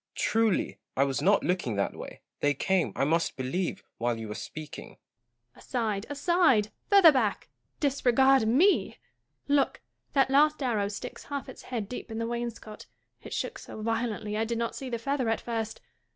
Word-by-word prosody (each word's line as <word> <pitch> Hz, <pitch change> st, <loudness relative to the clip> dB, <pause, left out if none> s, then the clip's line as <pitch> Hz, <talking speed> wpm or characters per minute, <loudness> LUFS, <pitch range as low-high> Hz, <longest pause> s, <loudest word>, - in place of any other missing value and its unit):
Truly, 225 Hz, -3 st, +1 dB, 0.2 s
I 135 Hz, -, +5 dB
was 135 Hz, -1 st, -1 dB
not 200 Hz, +2 st, +4 dB
looking 175 Hz, -, 0 dB
that 100 Hz, -, -1 dB
way: -, -, -9 dB, 0.2 s
they 145 Hz, 0 st, +2 dB
came, 190 Hz, +4 st, +1 dB
I -, -, 0 dB
must 165 Hz, +4 st, +1 dB
believe, 135 Hz, +8 st, -2 dB, 0.2 s
while 120 Hz, 0 st, 0 dB
you 110 Hz, -1 st, -6 dB
were -, -, -3 dB
speaking. 155 Hz, +6 st, -8 dB, 0.6 s
Joanna. -, -, -25 dB
Aside, 220 Hz, -4 st, -2 dB
aside! 290 Hz, -, +3 dB, 0.2 s
further 395 Hz, -5 st, +8 dB
back! 235 Hz, -7 st, 0 dB, 0.3 s
disregard 265 Hz, -3 st, +3 dB
me 325 Hz, -, +3 dB, 0.3 s
/ -, -, -48 dB
Look! -, -, -3 dB, 0.3 s
that 270 Hz, -1 st, +3 dB
last 300 Hz, +1 st, +4 dB
arrow 215 Hz, -6 st, +1 dB
sticks 200 Hz, 0 st, -7 dB
half 285 Hz, -1 st, -5 dB
its 260 Hz, -, -10 dB
head 230 Hz, -5 st, -4 dB
deep 250 Hz, +2 st, -7 dB
in 220 Hz, -, -5 dB
the 230 Hz, -, -1 dB
wainscot. 235 Hz, -2 st, -5 dB, 0.3 s
It -, -, -10 dB
shook -, -, -3 dB
so -, -, -9 dB
violently 225 Hz, -2 st, -2 dB
I 220 Hz, -, +1 dB
did 230 Hz, +1 st, -2 dB
not 230 Hz, 0 st, -2 dB
see 265 Hz, -, -6 dB
the 235 Hz, -, -2 dB
feather 260 Hz, 0 st, -1 dB
at 225 Hz, -, +1 dB
first. 225 Hz, -2 st, -4 dB
225 Hz, 180 wpm, -28 LUFS, 200-265 Hz, 0.6 s, further